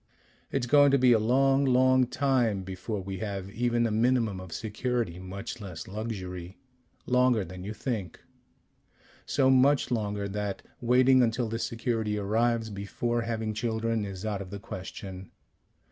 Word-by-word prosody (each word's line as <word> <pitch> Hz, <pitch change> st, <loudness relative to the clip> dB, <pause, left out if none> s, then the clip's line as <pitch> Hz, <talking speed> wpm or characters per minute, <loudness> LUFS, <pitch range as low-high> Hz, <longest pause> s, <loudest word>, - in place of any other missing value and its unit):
"It's 135 Hz, -3 st, 0 dB
going 145 Hz, +3 st, +6 dB
to 140 Hz, -, +4 dB
be 125 Hz, -1 st, +5 dB
a 115 Hz, -, +4 dB
long, 135 Hz, +5 st, +3 dB
long 130 Hz, -1 st, +4 dB
time 125 Hz, -7 st, +1 dB
before 95 Hz, +3 st, -4 dB
we 95 Hz, 0 st, -6 dB
have 100 Hz, -3 st, -4 dB
even 120 Hz, +1 st, +1 dB
a 115 Hz, -, 0 dB
minimum 115 Hz, -3 st, +1 dB
of 95 Hz, -2 st, -9 dB
security, 110 Hz, -3 st, -2 dB
much 100 Hz, +5 st, -7 dB
less 90 Hz, -5 st, -7 dB
luxury. 95 Hz, -4 st, -6 dB, 0.5 s
Longer 125 Hz, -4 st, +3 dB
than 90 Hz, +1 st, -9 dB
you 100 Hz, -, -5 dB
think.... 105 Hz, -, -4 dB, 1.1 s
So 135 Hz, -2 st, +3 dB
much 130 Hz, 0 st, +4 dB
longer 105 Hz, -3 st, -1 dB
that 100 Hz, 0 st, -4 dB, 0.2 s
waiting 130 Hz, +2 st, +5 dB
until 115 Hz, 0 st, +1 dB
the 115 Hz, +1 st, -3 dB
security 115 Hz, -2 st, -1 dB
arrives 110 Hz, +2 st, 0 dB
before 115 Hz, +4 st, -2 dB
having 110 Hz, -1 st, -2 dB
children 110 Hz, 0 st, -1 dB
is 100 Hz, 0 st, -6 dB
out 105 Hz, -2 st, -2 dB
of 95 Hz, -, -8 dB
the 100 Hz, -, -6 dB
question. 95 Hz, -2 st, -8 dB
110 Hz, 150 wpm, -28 LUFS, 100-125 Hz, 1.1 s, going